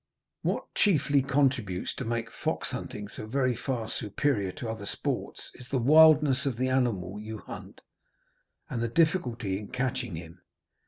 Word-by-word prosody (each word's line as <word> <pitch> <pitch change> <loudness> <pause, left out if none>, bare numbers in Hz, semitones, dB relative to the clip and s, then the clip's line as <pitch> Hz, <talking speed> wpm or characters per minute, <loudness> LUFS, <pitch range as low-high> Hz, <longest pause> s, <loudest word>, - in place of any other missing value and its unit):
What - - -2
chiefly 145 -7 +3
contributes 130 -9 +1
to - - -5
make 115 0 -2
fox - - -2
hunting 105 0 -5
so 110 +1 -8
very 130 +1 +1
far 120 -1 -3
superior 105 -2 -1
to 120 - -6
other 110 -2 -5
sports - - -4
is 125 0 -12
the 135 - +1
wildness 150 0 +6
of 125 -4 -1
the 130 +1 +1
animal 105 -7 0
you 110 +1 -6
hunt, - - -10 0.9
and 115 - -3
the 115 - +1
difficulty 120 - +1
in 105 - -8
catching 125 -5 -2
him. 85 +2 -10
120 Hz, 155 wpm, -29 LUFS, 105-135 Hz, 0.9 s, wildness